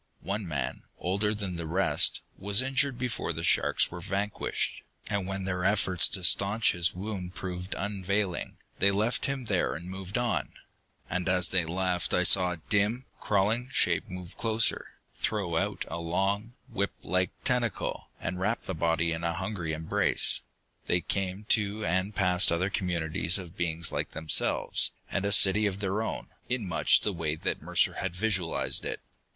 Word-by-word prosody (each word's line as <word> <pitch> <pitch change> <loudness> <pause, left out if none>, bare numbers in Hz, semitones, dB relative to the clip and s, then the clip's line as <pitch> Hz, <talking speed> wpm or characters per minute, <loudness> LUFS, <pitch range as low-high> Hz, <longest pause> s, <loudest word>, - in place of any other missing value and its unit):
One 100 0 -3
man, 75 -5 -3 0.2
older 100 +4 0
than 95 -4 -4
the 85 -1 -4
rest, 95 +5 +2
was 100 +1 +2
injured 135 0 +1
before 120 -8 -2
the 80 +1 -5
sharks - - +3
were 85 - -6
vanquished, 100 +4 -2 0.3
and 100 -3 -2
when 95 0 -3
their 90 -1 -2
efforts 95 -3 +3
to 95 - -2
staunch 100 +5 +4
his 85 -1 +1
wounds 95 -2 -5
proved 90 0 -5
unavailing, 100 -1 -2 0.2
they 100 - +5
left 105 +8 +1
him 135 -2 -3
there 100 -5 0
and 85 +2 -7
moved 95 +2 -5
on. 120 0 -1 0.5
And 90 0 -2
as 90 -1 +2
they 90 -3 +1
left 90 +1 -1
I 90 - +3
saw 90 0 +6
a - - -7
dim, 105 +5 +1
crawling 110 +5 +1
shape - - +1
move 90 0 -8
closer, 115 -1 +2 0.3
throw 100 -6 -1
out 80 - -1
a 85 - -5
long, 95 +7 -1
whiplike 95 - -1
tentacle, 125 -3 -1
and 90 +1 -4
wrap 105 +5 0
the 95 - -4
body 85 0 +1
in 80 +1 -3
a 85 0 0
hungry 95 -2 -3
embrace. 80 0 +1 0.5
They 90 - +2
came 95 +2 -2
to 105 -1 +2
and 95 +4 0
passed 90 -3 +4
other 90 +4 0
communities 85 -1 +1
of 90 -3 -9
beings 85 -1 -1
like - - -3
themselves, 80 -1 +2 0.2
and 100 0 -1
a 100 - +1
city 105 +1 +6
of 100 -1 -3
their 100 +1 -1
own, 110 - -4 0.2
in 125 -5 -1
much 90 - +3
the 105 - -1
way 80 -3 -2
that 80 - -3
Mercer - - +2
had 95 -2 -3
visualized 95 -4 0
it. - - -3
95 Hz, 170 wpm, -29 LUFS, 90-105 Hz, 0.5 s, saw